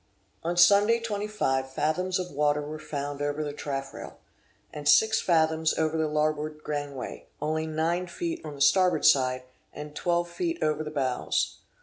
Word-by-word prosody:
On 170 +1 -2
Sunday 205 +6 +6
25 205 -12 -1
fathoms 180 +6 0
of 180 -1 -4
water 145 +1 +1
were 155 +1 -6
found 145 -1 -5
over 145 +1 -1
the 145 -1 -4
taffrail, 135 -2 -6 0.6
and 145 -1 -1
six 220 +9 +5
fathoms 160 -2 +2
over 160 0 0
the 160 -1 +1
larboard 150 0 -1
gangway; 145 -3 -5
only 155 +1 -1
nine 165 +3 -1
feet 335 - -4
on 150 - -7
the 140 - -10
starboard 180 +1 +4
side, 130 -3 +4 0.3
and 150 0 -8
12 175 +1 0
feet 335 - -3
over 155 0 0
the 150 - -5
bows. 135 -4 -1
155 Hz, 155 wpm, -27 LUFS, 145-175 Hz, 0.6 s, Sunday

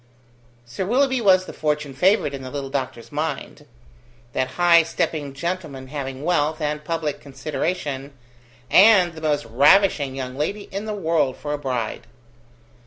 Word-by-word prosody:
Sir 120 +11 -4
Willoughby 260 +5 +2
was 185 -3 +4
the - - -9
fortune 150 -2 -2
favoured 180 -1 +2
in 135 - -6
the 130 - -7
little 140 -1 -5
doctor's 130 -4 -4
mind; 150 0 -4 0.7
that 130 - 0
high 175 -1 +6
stepping 155 -2 -2
gentleman 150 -4 -5
having 135 -1 -5
wealth, 155 -2 +1
and 150 -1 -2
public 155 -2 -3
consideration, 140 0 -4 0.6
and 190 -3 +6
the 160 - -10
most 150 -5 0
ravishing 140 - +4
young 130 -1 -5
lady 195 +9 -2
in 200 +2 -4
the 215 -1 -3
world 160 -8 0
for 145 0 -4
a 145 - -3
bride. 120 -4 -3
150 Hz, 150 wpm, -22 LUFS, 135-175 Hz, 0.7 s, high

